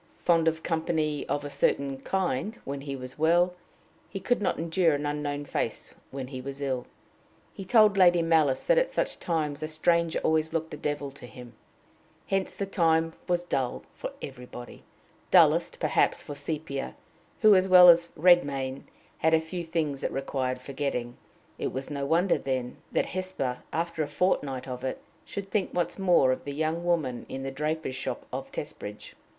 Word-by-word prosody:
Fond 165 Hz, -2 st, +4 dB
of 160 Hz, 0 st, 0 dB
company 160 Hz, -3 st, -1 dB
of 145 Hz, 0 st, -1 dB
a 145 Hz, -, -5 dB
certain 140 Hz, -1 st, 0 dB
kind 190 Hz, -, -1 dB
when 140 Hz, 0 st, -4 dB
he 140 Hz, -1 st, -5 dB
was 130 Hz, +1 st, -8 dB
well, 175 Hz, +3 st, +4 dB, 0.6 s
he 195 Hz, -, -5 dB
could 245 Hz, +3 st, 0 dB
not 195 Hz, -, 0 dB
endure 165 Hz, -1 st, +2 dB
an 145 Hz, +1 st, -3 dB
unknown 145 Hz, 0 st, -2 dB
face -, -, -3 dB, 0.2 s
when 130 Hz, -1 st, -6 dB
he 130 Hz, -2 st, -6 dB
was 140 Hz, +1 st, -6 dB
ill. 130 Hz, -3 st, -2 dB, 0.7 s
He 195 Hz, -, -8 dB
told 215 Hz, -2 st, +5 dB
Lady 175 Hz, -2 st, +6 dB
Malice 160 Hz, -5 st, +3 dB
that -, -, +4 dB
at -, -, +1 dB
such -, -, -2 dB
times 155 Hz, -3 st, -1 dB
a 155 Hz, -, -2 dB
stranger 165 Hz, +1 st, +1 dB
always 160 Hz, 0 st, +1 dB
looked 160 Hz, -1 st, -2 dB
a -, -, -5 dB
devil 145 Hz, -1 st, -3 dB
to 135 Hz, -2 st, -12 dB
him. 120 Hz, -1 st, -12 dB, 0.7 s
Hence 195 Hz, -1 st, -1 dB
the 200 Hz, -, -2 dB
time 165 Hz, -4 st, +2 dB
was 175 Hz, -1 st, +1 dB
dull 135 Hz, -7 st, -2 dB
for -, -, -6 dB
everybody 125 Hz, -2 st, -9 dB, 0.5 s
dullest, -, -, +4 dB
perhaps, -, -, +1 dB
for 145 Hz, -, -7 dB
Sepia, 145 Hz, -2 st, -4 dB, 0.5 s
who, 215 Hz, -2 st, +8 dB
as 185 Hz, -1 st, +4 dB
well 180 Hz, -1 st, +9 dB
as 170 Hz, 0 st, +7 dB
Redmain, 140 Hz, -6 st, +3 dB, 0.3 s
had 160 Hz, 0 st, +4 dB
a -, -, +4 dB
few 170 Hz, +2 st, -5 dB
things 160 Hz, -4 st, -2 dB
that -, -, -1 dB
required 130 Hz, -1 st, -2 dB
forgetting. 130 Hz, -3 st, -3 dB, 0.4 s
It -, -, -2 dB
was 135 Hz, +2 st, -5 dB
no 140 Hz, -1 st, -2 dB
wonder, 175 Hz, +5 st, +3 dB
then, 130 Hz, -2 st, -3 dB
that -, -, +1 dB
Hesper, 185 Hz, -9 st, -3 dB
after 165 Hz, 0 st, -2 dB
a 150 Hz, -, 0 dB
fort 180 Hz, +6 st, +1 dB
night 135 Hz, -3 st, -5 dB
of 125 Hz, 0 st, -6 dB
it, 130 Hz, -, -3 dB, 0.3 s
should 195 Hz, -1 st, -6 dB
think 200 Hz, -3 st, -1 dB
once 175 Hz, +2 st, -1 dB
more 175 Hz, -9 st, +4 dB
of 130 Hz, -, -2 dB
the 140 Hz, -, -5 dB
young 160 Hz, +2 st, -1 dB
woman 160 Hz, -8 st, -1 dB
in 135 Hz, 0 st, -5 dB
the 135 Hz, -, -3 dB
draper's 150 Hz, +1 st, -2 dB
shop 130 Hz, -, -4 dB
of -, -, -5 dB
Testbridge. 105 Hz, +1 st, -7 dB
155 Hz, 180 wpm, -28 LUFS, 135-175 Hz, 0.7 s, well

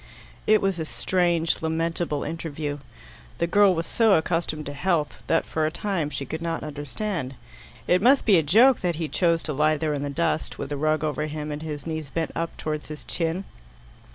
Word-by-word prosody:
It 215 Hz, -1 st, +5 dB
was 195 Hz, -3 st, +1 dB
a 160 Hz, -, -2 dB
strange 170 Hz, -1 st, +1 dB
lamentable 160 Hz, -1 st, -1 dB
interview. 150 Hz, -3 st, -4 dB, 0.6 s
The 170 Hz, -, +1 dB
girl 195 Hz, +2 st, +5 dB
was 165 Hz, 0 st, -2 dB
so 225 Hz, +1 st, +3 dB
accustomed 160 Hz, -2 st, 0 dB
to 145 Hz, -, -5 dB
health, 160 Hz, -1 st, -1 dB
that 165 Hz, -, +2 dB
for 160 Hz, -, -1 dB
a -, -, -2 dB
time 175 Hz, -3 st, -2 dB
she 140 Hz, -, -4 dB
could 160 Hz, +4 st, -5 dB
not 165 Hz, -1 st, -2 dB
understand. 145 Hz, 0 st, -4 dB, 0.5 s
It 180 Hz, +1 st, +4 dB
must 260 Hz, +5 st, +5 dB
be 205 Hz, -5 st, +6 dB
a -, -, +4 dB
joke 225 Hz, -, +5 dB
that 175 Hz, -2 st, -1 dB
he 160 Hz, 0 st, -2 dB
chose 170 Hz, 0 st, +1 dB
to 150 Hz, -, -3 dB
lie 155 Hz, +2 st, +2 dB
there 155 Hz, 0 st, -1 dB
in 145 Hz, -, -2 dB
the 145 Hz, -, -2 dB
dust, 160 Hz, +1 st, -1 dB
with 140 Hz, -, -5 dB
a -, -, 0 dB
rug 155 Hz, +1 st, +1 dB
over 150 Hz, 0 st, -1 dB
him 150 Hz, 0 st, -5 dB
and 150 Hz, +1 st, -5 dB
his 150 Hz, -3 st, -5 dB
knees 160 Hz, -3 st, -4 dB
bent 165 Hz, +3 st, -2 dB
up 165 Hz, 0 st, -3 dB
towards 155 Hz, -1 st, -4 dB
his 150 Hz, -1 st, -8 dB
chin. 170 Hz, +2 st, -2 dB
160 Hz, 205 wpm, -25 LUFS, 150-175 Hz, 0.6 s, be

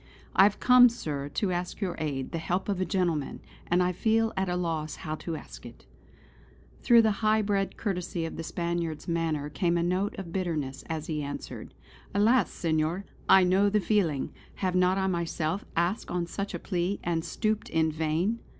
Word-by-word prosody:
"I -, -, +7 dB
have 205 Hz, -, +1 dB
come, 250 Hz, -1 st, +7 dB
Sir, 145 Hz, -11 st, -4 dB
to 190 Hz, +6 st, -1 dB
ask 175 Hz, 0 st, -3 dB
your 190 Hz, -4 st, -1 dB
aid, 140 Hz, -4 st, -3 dB
the 165 Hz, -, -2 dB
help 180 Hz, +3 st, -2 dB
of 195 Hz, -2 st, 0 dB
a -, -, +1 dB
gentleman; 170 Hz, -8 st, -1 dB, 0.3 s
and 180 Hz, +1 st, +3 dB
I 180 Hz, -, +1 dB
feel 225 Hz, +4 st, +1 dB
at 190 Hz, -1 st, 0 dB
a 180 Hz, -, 0 dB
loss 165 Hz, -3 st, -2 dB
how 155 Hz, -, -2 dB
to 165 Hz, 0 st, -5 dB
ask -, -, -10 dB
it." -, -, -12 dB, 1.0 s
Through 235 Hz, -2 st, +6 dB
the 220 Hz, -, +3 dB
high 215 Hz, 0 st, +3 dB
bred 200 Hz, -1 st, -1 dB
courtesy 180 Hz, -4 st, -2 dB
of 165 Hz, -, -5 dB
the -, -, -5 dB
Spaniard's 170 Hz, -1 st, -3 dB
manner 165 Hz, -4 st, -1 dB
came 170 Hz, +4 st, 0 dB
a 170 Hz, -, +1 dB
note 185 Hz, +4 st, 0 dB
of 170 Hz, -4 st, -7 dB
bitterness, 155 Hz, -8 st, -2 dB
as 160 Hz, -1 st, -3 dB
he 155 Hz, -2 st, -2 dB
answered: 145 Hz, 0 st, -7 dB, 0.4 s
"Alas! 225 Hz, +5 st, +4 dB
Senor, 165 Hz, +3 st, -1 dB, 0.2 s
I 190 Hz, -, +8 dB
know 190 Hz, +3 st, +4 dB
the 210 Hz, +1 st, +2 dB
feeling. 180 Hz, -8 st, 0 dB, 0.2 s
Have 185 Hz, -2 st, -1 dB
not 180 Hz, +1 st, +3 dB
I 190 Hz, -, +1 dB
myself 170 Hz, 0 st, -1 dB
asked 175 Hz, +6 st, 0 dB
on 175 Hz, -1 st, -1 dB
such 200 Hz, +4 st, -4 dB
a -, -, -4 dB
plea; 180 Hz, +1 st, -1 dB
and 165 Hz, -1 st, -1 dB
stooped 215 Hz, +5 st, -1 dB
in 160 Hz, -1 st, +2 dB
vain!" 160 Hz, +8 st, 0 dB
175 Hz, 190 wpm, -28 LUFS, 160-195 Hz, 1.0 s, I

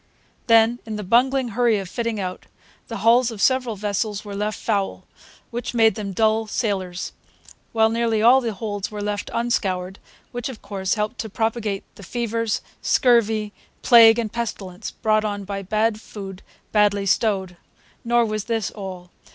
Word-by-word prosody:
Then, 230 Hz, +1 st, +5 dB
in 220 Hz, -1 st, -6 dB
the 210 Hz, -, -4 dB
bungling 250 Hz, +5 st, +2 dB
hurry 230 Hz, 0 st, +2 dB
of 195 Hz, -2 st, -4 dB
fitting 230 Hz, +3 st, -3 dB
out, 185 Hz, -1 st, -5 dB, 0.4 s
the 230 Hz, -, -5 dB
hulls 235 Hz, +1 st, +5 dB
of 225 Hz, -3 st, -8 dB
several 255 Hz, -1 st, +2 dB
vessels 210 Hz, +1 st, -2 dB
were 200 Hz, -1 st, -6 dB
left 210 Hz, +1 st, -2 dB
foul, 200 Hz, -1 st, -1 dB, 0.5 s
which 240 Hz, +1 st, -4 dB
made 225 Hz, -1 st, +5 dB
them 205 Hz, -3 st, -5 dB
dull 220 Hz, +2 st, +1 dB
sailers; 190 Hz, -5 st, -2 dB, 0.6 s
while 220 Hz, -1 st, +3 dB
nearly 230 Hz, -1 st, +1 dB
all 245 Hz, +4 st, +6 dB
the 235 Hz, -2 st, -2 dB
holds 205 Hz, -1 st, -4 dB
were 210 Hz, -1 st, -5 dB
left 205 Hz, 0 st, -3 dB
unscoured, 190 Hz, -6 st, -1 dB, 0.3 s
which, 245 Hz, +1 st, -4 dB
of 255 Hz, -, -8 dB
course, 195 Hz, -1 st, -2 dB
helped 210 Hz, -1 st, -3 dB
to 220 Hz, -, -4 dB
propagate 220 Hz, -2 st, -2 dB
the -, -, -11 dB
fevers, 230 Hz, +2 st, -2 dB, 0.2 s
scurvy, 220 Hz, -4 st, +2 dB, 0.3 s
plague, 230 Hz, -2 st, +8 dB
and 225 Hz, -3 st, -2 dB
pestilence 200 Hz, -6 st, -4 dB
brought 215 Hz, 0 st, +1 dB
on 205 Hz, -1 st, -3 dB
by 195 Hz, 0 st, -4 dB
bad 215 Hz, +3 st, 0 dB
food 195 Hz, -4 st, -9 dB, 0.3 s
badly 205 Hz, -1 st, +3 dB
stowed. 190 Hz, -3 st, +1 dB, 0.5 s
Nor 240 Hz, 0 st, +3 dB
was 215 Hz, -2 st, -3 dB
this 225 Hz, -3 st, -1 dB
all. 185 Hz, -3 st, -8 dB
215 Hz, 160 wpm, -22 LUFS, 200-230 Hz, 0.6 s, plague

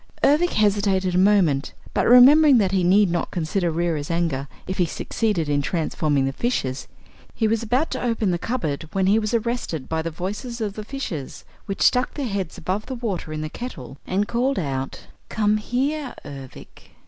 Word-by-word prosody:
Ervic 320 Hz, +5 st, +3 dB
hesitated 200 Hz, -3 st, +2 dB
a -, -, +1 dB
moment 185 Hz, -8 st, +3 dB, 0.2 s
but, -, -, +1 dB
remembering 270 Hz, +4 st, +8 dB
that 195 Hz, -4 st, +2 dB
he 190 Hz, -2 st, +1 dB
need 190 Hz, +1 st, +4 dB
not 175 Hz, -, -1 dB
consider 175 Hz, +1 st, -1 dB
Reera's 165 Hz, -3 st, -1 dB
anger 165 Hz, -5 st, -1 dB, 0.2 s
if 185 Hz, -, -5 dB
he 180 Hz, -, +4 dB
succeeded 195 Hz, -1 st, -1 dB
in 145 Hz, -1 st, +1 dB
transforming 150 Hz, -3 st, 0 dB
the 135 Hz, -, -2 dB
fishes, 135 Hz, -, -2 dB, 0.5 s
he 220 Hz, -, +1 dB
was 225 Hz, +1 st, +1 dB
about 250 Hz, +7 st, 0 dB
to -, -, -3 dB
open 230 Hz, -5 st, 0 dB
the 175 Hz, -, -1 dB
cupboard 165 Hz, -, -3 dB
when 190 Hz, -1 st, +1 dB
he 205 Hz, +3 st, +4 dB
was 215 Hz, +1 st, -1 dB
arrested 230 Hz, -, -2 dB
by 160 Hz, 0 st, -1 dB
the 165 Hz, -, -3 dB
voices 205 Hz, -, -5 dB
of 210 Hz, -3 st, -2 dB
the 215 Hz, -, -6 dB
fishes, 205 Hz, -, -6 dB, 0.2 s
which 195 Hz, -, -1 dB
stuck 250 Hz, 0 st, +3 dB
their 285 Hz, -, -2 dB
heads 195 Hz, -7 st, -3 dB
above 195 Hz, +4 st, -3 dB
the 260 Hz, -, -4 dB
water 210 Hz, -9 st, -4 dB
in 155 Hz, 0 st, -4 dB
the 155 Hz, -, -3 dB
kettle 140 Hz, -, -8 dB
and 200 Hz, +3 st, 0 dB
called 255 Hz, +3 st, 0 dB
out: 135 Hz, -5 st, -3 dB, 0.3 s
"Come 210 Hz, -1 st, +2 dB
here, 270 Hz, +6 st, -2 dB
Ervic!" 135 Hz, -2 st, -11 dB
195 Hz, 185 wpm, -23 LUFS, 160-235 Hz, 0.5 s, remembering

